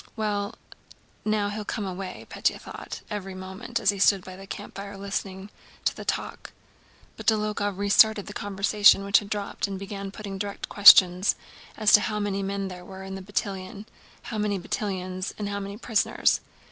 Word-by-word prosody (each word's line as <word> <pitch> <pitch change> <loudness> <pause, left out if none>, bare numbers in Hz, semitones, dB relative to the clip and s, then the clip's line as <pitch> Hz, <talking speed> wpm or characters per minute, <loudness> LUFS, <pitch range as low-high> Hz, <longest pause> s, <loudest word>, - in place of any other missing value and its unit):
"Well, 210 -1 -2 0.7
now 210 -1 +1
he'll 210 +1 -4
come 210 0 -3
away," 190 0 -6
Pétya - - -1
thought - - -8
every 195 -2 -5
moment 190 +5 -5
as - - +3
he 200 - -7
stood 195 -1 +4
by 185 - -9
the 195 +1 -11
campfire 200 0 -7
listening 195 0 -5 0.3
to - - +1
the - - -7
talk. - - -4 0.6
But - - -10
Dólokhov 210 -2 +1
restarted 205 +1 +4
the 205 - -8
conversation 200 0 +4
which 200 +1 +5
had 205 - -10
dropped 205 -1 -2
and 195 -1 -5
began 195 0 -6
putting 200 -1 -7
direct 200 0 -4
questions 185 -2 +8 0.4
as 215 -1 +3
to 210 - +9
how 210 -1 -2
many 200 -1 -1
men 195 0 -2
there 180 -1 -8
were 190 +1 -10
in 190 0 -7
the 190 - -6
battalion, 195 0 -4 0.4
how 220 - -5
many 210 -1 0
battalions, 185 -1 -4
and 205 -1 -3
how 200 0 -3
many 200 +1 -6
prisoners. 225 -2 +1
200 Hz, 175 wpm, -26 LUFS, 195-210 Hz, 0.7 s, to